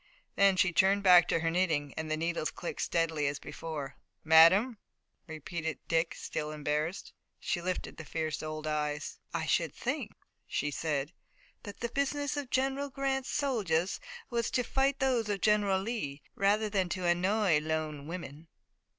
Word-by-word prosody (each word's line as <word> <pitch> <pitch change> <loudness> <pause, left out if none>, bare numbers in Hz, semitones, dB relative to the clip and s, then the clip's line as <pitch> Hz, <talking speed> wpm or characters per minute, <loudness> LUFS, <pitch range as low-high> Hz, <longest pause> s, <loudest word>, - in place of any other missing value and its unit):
Then 200 -1 +5
she 185 -1 +3
turned 195 +3 +3
back 180 -2 +7
to 165 - +1
her 165 0 +1
knitting, 160 -6 0
and 160 0 -4
the 155 - 0
needles 165 -1 -1
clicked 175 - -5
steadily 160 -3 0
as 140 0 -1
before. 145 -4 -6 0.3
"Madame!" 185 +9 +6 0.5
repeated 160 +1 -4
Dick, 165 0 +1
still 150 - -4
embarrassed. 150 +3 -2 0.3
She 175 - -2
lifted 185 +1 -3
the 165 - -7
fierce 155 0 -3
old 155 0 -5
eyes. 150 -1 -2
"I - - -2
should - - +1
think," - - -3 0.3
she 145 +1 -1
said, 145 0 -2 0.5
"that 205 -3 -10
the 235 - -1
business 280 +2 -1
of 285 -3 -4
General 270 +2 0
Grant's 270 0 -2
soldiers 200 - 0 0.3
was 235 -1 0
to 250 - +1
fight 270 +3 +1
those 250 -5 +1
of 200 -2 -1
General 205 -3 +3
Lee 190 - -4
rather 205 +2 +2
than 195 -3 0
to 185 0 -3
annoy 180 0 +3
lone 155 -2 -3
women." 165 -2 -7
175 Hz, 160 wpm, -31 LUFS, 155-215 Hz, 0.5 s, back